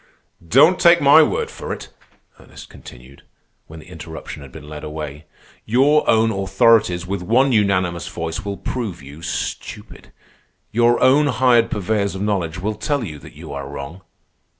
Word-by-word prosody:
"Don't 145 - +4
take 170 0 +6
my 145 +3 +7
word 155 - 0
for - - -7
it," - - -7 0.5
Ernest - - -14
continued, 65 +3 -14 0.5
when 80 0 -11
the - - -16
interruption 80 -3 -9
had 70 -2 -12
been 75 - -12
led 75 0 -9
away. 75 -1 -7 0.4
"Your 140 +7 +2
own 110 0 +3
authorities 95 -2 +2
with 95 0 -4
one 125 +9 +2
unanimous 95 -6 +1
voice 80 -1 -5
will 100 -1 -5
prove 100 - -5
you 70 +3 -12
stupid. 85 - -6 0.6
Your 120 +1 +3
own 145 +3 +4
hired 125 -3 +3
purveyors 100 -1 -1
of 95 - -4
knowledge 95 -6 -2
will 105 +4 -2
tell 135 +6 -2
you 75 -8 -7
that - - -14
you - - -9
are 70 -1 -6
wrong. 70 +6 -8
100 Hz, 160 wpm, -20 LUFS, 80-120 Hz, 0.6 s, my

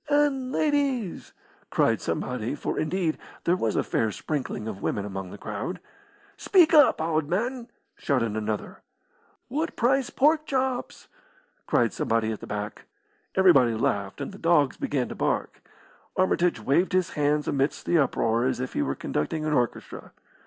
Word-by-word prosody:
"And 285 -3 +2
ladies!" 275 - 0 0.4
cried - - +2
somebody, - - -2
for, - - -3
indeed, 160 +1 -1 0.2
there 175 - +3
was 115 - -1
a - - +2
fair 110 - 0
sprinkling 130 -2 -4
of 100 -3 -6
women 100 - -1
among 95 -2 -5
the 100 - -9
crowd. 110 - -5 0.6
"Speak 355 -4 +4
up, 295 -3 +6
owd 160 -2 0
man!" 235 - -2 0.3
shouted 115 -6 0
another. 110 -1 -4 0.7
"What 310 +6 -2
price 260 +2 +2
pork 305 +2 +2
chops?" 260 -2 -2 0.6
cried - - +2
somebody 110 -1 0
at 110 - -5
the - - -9
back. 105 0 -5 0.5
Everybody 140 -12 +5
laughed, 100 -3 -1
and - - -4
the 195 - -12
dogs 150 -5 +3
began 130 -4 -1
to - - -5
bark. - - -2 0.6
Armitage 180 -5 +2
waved 140 - +1
his 185 -1 +1
hands 150 0 0
amidst 140 +1 0
the 170 - +3
uproar 115 -4 +1
as 130 -2 0
if 130 0 -4
he - - 0
were 70 -1 -1
conducting 155 - -2
an 155 - 0
orchestra. 120 -4 -2
155 Hz, 155 wpm, -26 LUFS, -, 0.7 s, up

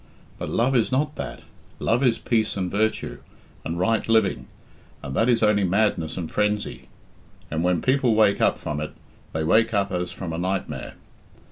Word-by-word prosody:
But - - -4
love 125 +3 +1
is 120 0 +2
not 150 +3 0
that. - - -6 0.3
Love 115 +3 +1
is 120 -3 +3
peace 110 -3 0
and 90 -2 -2
virtue, 110 +2 -1 0.4
and 85 - -3
right 110 +5 +1
living, 105 - +2 0.6
and 65 - -5
that 115 +3 +3
is 115 -2 +3
only 105 -1 +4
madness 95 -4 +1
and 85 -3 -4
frenzy, 105 0 -1 0.6
and 80 +1 -1
when 90 -2 +1
people 130 -3 +3
wake 105 -2 +4
up - - +3
from 75 0 -4
it 75 0 -5 0.4
they 80 - -2
wake 110 +7 +3
up 100 -1 +1
as 90 -1 -2
from 85 -4 -5
a 80 - -3
nightmare. 95 +2 -3
105 Hz, 175 wpm, -24 LUFS, 90-115 Hz, 0.6 s, only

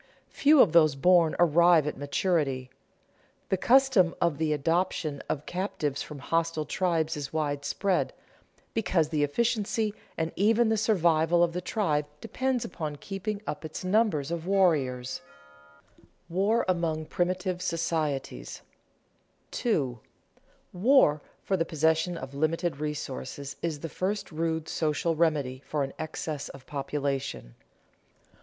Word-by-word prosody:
Few 295 +1 +4
of 185 - 0
those 155 -4 +5
born 170 +2 +4
arrive 170 -1 +5
at 150 - -2
maturity. 140 -3 -1 0.8
The 190 - +2
custom 245 -6 +4
of 170 -4 +1
the 160 -1 +1
adoption 155 -1 0
of 150 0 -2
captives 175 -6 -2
from 150 - -7
hostile 165 +1 -1
tribes 165 -2 0
is 145 -2 -5
widespread, 155 +5 -1 0.6
because 185 -8 +1
the 150 -2 +1
efficiency 215 - 0 0.2
and 160 0 -1
even 220 +3 +3
the 220 - +2
survival 175 -6 +3
of 170 -1 +1
the 180 - -3
tribe 155 -8 0
depends 260 +4 -1
upon 155 -4 -5
keeping 200 +6 -5
up 150 - -5
its 155 +3 -6
number 200 -4 +2
of 165 +4 -5
warriors. 135 -10 +1 0.7
[Sidenote: - - -28 0.2
War 200 +7 +1
among 165 -3 0
primitive 180 +2 -1
societies] 160 - -2 0.9
2. 135 - -1 0.8
_War 180 - +4 0.2
for 195 - 0
the 170 - +1
possession 160 +2 +1
of 130 -1 -8
limited 155 +1 -1
resources 140 -2 -5
is 155 -4 -3
the 165 - -3
first 195 +5 -3
rude 160 0 -2
social 160 +1 0
remedy 145 -6 0
for 150 -2 -2
an 135 - -5
excess 155 -2 -4
of 135 -1 -12
population. 140 - -3
165 Hz, 130 wpm, -28 LUFS, 150-185 Hz, 0.9 s, those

